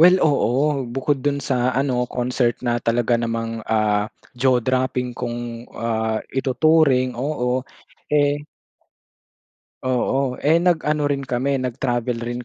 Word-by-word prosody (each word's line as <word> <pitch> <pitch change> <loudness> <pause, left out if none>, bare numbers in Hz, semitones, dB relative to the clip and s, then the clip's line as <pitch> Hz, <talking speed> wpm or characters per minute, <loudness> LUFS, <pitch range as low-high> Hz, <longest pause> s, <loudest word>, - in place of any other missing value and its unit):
well, 180 +3 +8
oo. 140 -1 +2
Bukod 135 +3 -1
dun 140 +1 0
sa 130 -3 0
ano 125 -2 +1
concert 125 -1 0
na 120 0 +1
talaga 120 +1 +1
namang, 115 -1 -2
ah, 105 -1 +2 0.3
jaw 130 0 +4
dropping 130 -1 0
kung, 120 -1 -5
ah, 110 -1 -1
ituturing 135 -1 +3
oo, 125 -1 -1 0.5
eh 145 0 +2 1.4
Oo, 130 +1 0
eh, 160 +3 +3
nag-ano 150 -4 +1
rin 140 -1 -2
kami 130 +2 0
nag-travel 120 -1 -2
rin 120 +1 -4
125 Hz, 120 wpm, -22 LUFS, 120-140 Hz, 1.4 s, well